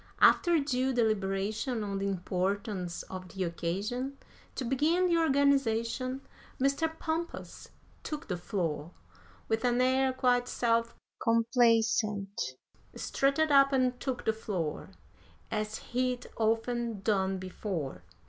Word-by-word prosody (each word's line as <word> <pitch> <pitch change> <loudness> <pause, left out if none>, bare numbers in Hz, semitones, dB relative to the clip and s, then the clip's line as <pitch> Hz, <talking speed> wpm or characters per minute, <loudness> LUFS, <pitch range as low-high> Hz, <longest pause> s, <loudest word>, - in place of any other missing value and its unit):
After 345 -2 +6
due 265 -3 0
deliberation 215 +1 0
on 200 -1 -3
the 200 - -1
importance 190 0 -2
of 185 -1 -8
the 190 0 -3
occasion, 205 +11 -3 0.4
To 260 - -3
begin 305 +9 +2
the 340 -2 +3
organization, 270 -4 +2 0.4
Mr. 275 +5 +2
Pompous 325 +2 -4 0.3
took 300 -1 -5
the 180 - -1
floor 175 -3 -3 0.5
With 225 +1 0
an 245 0 +2
air 260 +1 +3
quite 245 -1 +2
self 230 -1 +1 0.3
complacent, 225 - +2 0.4
strutted 280 +3 +1
up 275 0 +6
and 255 -2 +1
took 260 -3 -3
the 220 - +3
floor, 185 -8 -3 0.6
As 215 0 -2
he'd 250 0 -2
often 230 -1 0
done 190 -2 +1
before! 185 - -4
230 Hz, 115 wpm, -30 LUFS, 195-260 Hz, 0.6 s, After